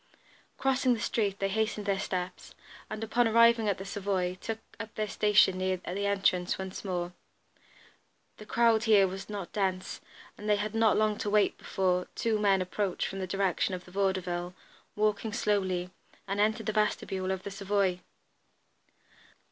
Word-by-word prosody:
Crossing 260 Hz, -2 st, +2 dB
the -, -, -6 dB
street, 205 Hz, -3 st, 0 dB
they 195 Hz, -, 0 dB
hastened 215 Hz, +1 st, -1 dB
their 195 Hz, -1 st, 0 dB
steps, 180 Hz, -2 st, -4 dB, 0.3 s
and 215 Hz, +1 st, -5 dB
upon 235 Hz, +2 st, +2 dB
arriving 230 Hz, -1 st, +5 dB
at 200 Hz, -, 0 dB
the 195 Hz, -, -7 dB
Savoy, 190 Hz, -2 st, -1 dB
took 225 Hz, -1 st, -3 dB, 0.2 s
up 225 Hz, -1 st, -7 dB
their 215 Hz, 0 st, -1 dB
station 205 Hz, -2 st, +4 dB
near 185 Hz, 0 st, 0 dB
the 190 Hz, +3 st, -3 dB
entrance 195 Hz, -3 st, +1 dB
once 190 Hz, -1 st, -6 dB
more. 180 Hz, -2 st, -3 dB, 1.2 s
The 215 Hz, -, -12 dB
crowd 230 Hz, -1 st, +3 dB
here 205 Hz, -3 st, +6 dB
was 195 Hz, +2 st, -7 dB
not 200 Hz, -4 st, -6 dB
dense, 190 Hz, -2 st, -2 dB, 0.4 s
and 210 Hz, -, -4 dB
they 210 Hz, -, +5 dB
had 210 Hz, +1 st, -3 dB
not 225 Hz, -2 st, +3 dB
long 215 Hz, -1 st, +1 dB
to 205 Hz, -, -2 dB
wait 210 Hz, 0 st, +3 dB
before 180 Hz, -1 st, 0 dB
two 225 Hz, -2 st, 0 dB
men 195 Hz, -2 st, +3 dB
approached 185 Hz, 0 st, -2 dB
from 195 Hz, -, -6 dB
the 185 Hz, -, -3 dB
direction 195 Hz, 0 st, 0 dB
of 180 Hz, -, -9 dB
the 180 Hz, -, -14 dB
Vaudeville, 180 Hz, -2 st, -1 dB, 0.4 s
walking 215 Hz, +1 st, 0 dB
slowly, 190 Hz, -5 st, 0 dB, 0.4 s
and 195 Hz, +1 st, -2 dB
entered 220 Hz, +1 st, +1 dB
the 215 Hz, -, -1 dB
vestibule 195 Hz, -3 st, 0 dB
of 190 Hz, -1 st, -2 dB
the 200 Hz, -, -6 dB
Savoy. 195 Hz, -2 st, 0 dB
200 Hz, 165 wpm, -30 LUFS, 185-215 Hz, 1.2 s, here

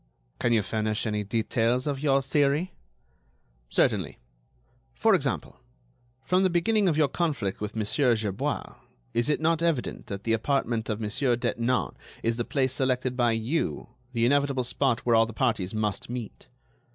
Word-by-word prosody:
"Can 120 Hz, -, +1 dB
you 110 Hz, -3 st, +3 dB
furnish 110 Hz, +2 st, -1 dB
any 105 Hz, -1 st, -1 dB
details 115 Hz, +4 st, 0 dB
of 140 Hz, -2 st, -1 dB
your 140 Hz, -2 st, +2 dB
theory?" 145 Hz, +6 st, +1 dB, 1.0 s
"Certainly. -, -, +1 dB, 0.8 s
For -, -, +3 dB
example, -, -, -1 dB, 0.6 s
from 180 Hz, +6 st, +2 dB
the 190 Hz, -, +3 dB
beginning 190 Hz, +3 st, +2 dB
of 155 Hz, -, 0 dB
your 155 Hz, -2 st, +4 dB
conflict 140 Hz, -, -2 dB
with 105 Hz, +1 st, -4 dB
Monsieur 115 Hz, +4 st, +2 dB
Gerbois, 105 Hz, -3 st, -3 dB, 0.4 s
is 120 Hz, +5 st, +1 dB
it 150 Hz, -, +2 dB
not 165 Hz, +1 st, +1 dB
evident 165 Hz, -7 st, -1 dB
that 100 Hz, 0 st, -6 dB
the 115 Hz, -, +1 dB
apartment 115 Hz, -1 st, 0 dB
of 105 Hz, 0 st, -1 dB
Monsieur 115 Hz, +4 st, +1 dB
Detinan 120 Hz, +1 st, 0 dB, 0.3 s
is 115 Hz, 0 st, 0 dB
the 120 Hz, -, 0 dB
place 130 Hz, -3 st, 0 dB
selected 130 Hz, -1 st, 0 dB
by 120 Hz, -2 st, +2 dB
you, 115 Hz, +9 st, -2 dB, 0.2 s
the 115 Hz, -1 st, +2 dB
inevitable 140 Hz, 0 st, +2 dB
spot 125 Hz, 0 st, 0 dB
where 120 Hz, -1 st, +2 dB
all 115 Hz, 0 st, +5 dB
the 115 Hz, -, -8 dB
parties 110 Hz, -5 st, 0 dB
must 105 Hz, -1 st, -2 dB
meet? 120 Hz, -3 st, -7 dB
125 Hz, 160 wpm, -27 LUFS, 110-140 Hz, 1.0 s, all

